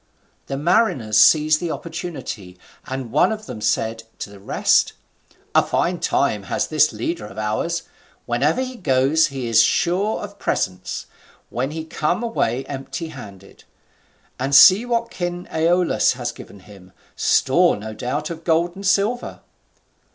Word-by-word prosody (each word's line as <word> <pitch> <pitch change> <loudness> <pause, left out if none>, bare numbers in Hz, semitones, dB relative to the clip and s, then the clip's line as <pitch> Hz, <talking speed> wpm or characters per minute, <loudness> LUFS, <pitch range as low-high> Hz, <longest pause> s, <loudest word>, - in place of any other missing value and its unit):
The 135 - -3
mariners 140 - +2
seized 155 +5 +5
the 175 - -3
opportunity, 160 - -6 0.3
and 130 -3 -5
one 150 - +3
of 215 0 -5
them 120 -5 -8
said 110 +1 0 0.2
to 100 - -7
the 100 - -13
rest, 100 - +2 0.6
"A - - +6
fine - - -1
time 105 - 0
has - - 0
this 155 0 +3
leader 165 -11 -4
of 100 - -13
ours; 110 +11 -2 0.4
wherever 140 - +1
he 255 -1 -7
goes 140 - +2
he 135 -3 -5
is 115 -1 +5
sure 190 - +1
of 200 0 -9
presents, 90 0 -2 0.5
when 130 +3 -2
we 160 +1 -6
come 160 +6 -1
away 135 - -1
empty 140 +4 -6
handed; 100 -9 -12 0.8
and 135 +2 0
see 200 - +8
what 235 -1 -1
King 175 0 -4
Aeolus 170 +2 +2
has - - -4
given 100 - -13
him, 95 -2 -16 0.2
store - - +3
no 110 +1 -7
doubt 145 +8 -3
of 165 0 -8
gold 170 +2 +1
and 195 0 -4
silver." 205 +6 0
150 Hz, 150 wpm, -21 LUFS, 115-175 Hz, 0.8 s, see